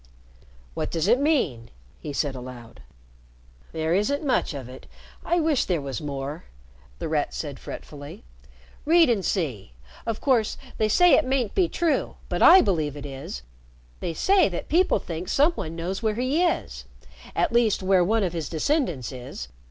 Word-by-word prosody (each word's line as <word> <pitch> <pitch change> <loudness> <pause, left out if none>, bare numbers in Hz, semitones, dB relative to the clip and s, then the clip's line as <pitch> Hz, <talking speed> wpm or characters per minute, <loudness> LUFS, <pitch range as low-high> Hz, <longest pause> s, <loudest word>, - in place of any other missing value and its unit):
"What - - -3
does 165 +2 -1
it 240 +4 +4
mean?" 250 - 0 0.3
he 150 - -6
said 140 0 -1
aloud. 125 -2 -10 0.9
"There 160 0 -1
isn't 280 - 0
much 255 - +1
of 135 -4 -6
it. 130 +1 -12 0.4
I 345 - +1
wish 310 -4 +2
there 175 -4 0
was 135 -5 -5
more," 145 +2 -5 0.5
The 165 - -4
Rat 155 -2 -1
said 145 -4 -5
fretfully. 150 +8 -9 0.6
"Read 325 -2 +5
and 205 -5 0
see. 130 - -2 0.3
Of 225 -2 -2
course 245 -6 +1 0.2
they 215 -1 +2
say 355 - +5
it - - +6
mayn't 255 -5 0
be 360 -3 +2
true 335 -3 0
but - - -2
I 370 +3 +9
believe 155 - 0
it 145 - -7
is. 135 - -7 0.6
They 165 - -4
say 385 - +4
that 175 - -6
people 355 -3 +3
think 175 -2 -6
some 295 +5 +4
one 165 - -6
knows 180 +5 -3
where 220 -2 0
he 260 +8 +1
is 350 - -1 0.5
at - - +1
least 230 -5 +2
where 185 -1 +4
one 220 +4 +2
of 180 -3 -1
his 165 -4 -4
descendants 170 - -1
is. 120 - -8
180 Hz, 170 wpm, -25 LUFS, -, 0.9 s, I